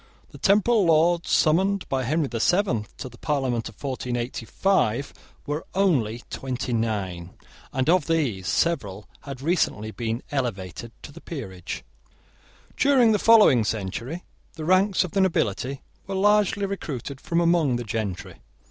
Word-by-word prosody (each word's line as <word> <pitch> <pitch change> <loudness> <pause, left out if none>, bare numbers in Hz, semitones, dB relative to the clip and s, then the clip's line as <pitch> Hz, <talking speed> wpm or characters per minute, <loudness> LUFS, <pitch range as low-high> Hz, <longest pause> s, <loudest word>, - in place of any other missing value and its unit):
The - - -12
temporal 210 +1 +3
Lords 165 +2 +3
summoned 190 +5 +2
by 130 -2 -1
Henry 155 +5 +1
the 120 -3 -4
Seventh 155 - +1
to - - -6
the 120 -1 -14
parliament 130 -7 -1
of 110 - -16
1485 125 - -1 0.3
were 150 +2 -3
only 125 - +1
twenty 130 -2 -3
nine, 95 -6 -2 0.4
and 130 +1 -1
of 170 -2 +3
these 135 - 0
several 105 - -1 0.2
had 135 -2 -7
recently 140 - 0
been 115 +1 -3
elevated 115 - -3
to - - -9
the 170 +4 -13
peerage. 95 - -7 0.9
During 260 -5 +4
the 210 - +2
following 215 - +6
century 115 - -4 0.3
the 155 - -6
ranks 185 +2 +3
of 180 - -6
the 195 - +1
nobility 135 - 0 0.2
were 195 - -3
largely 205 0 +3
recruited 140 -8 -5
from 170 - 0
among 170 -6 +3
the 120 - -3
gentry. 105 -4 -4
140 Hz, 140 wpm, -25 LUFS, 115-180 Hz, 0.9 s, following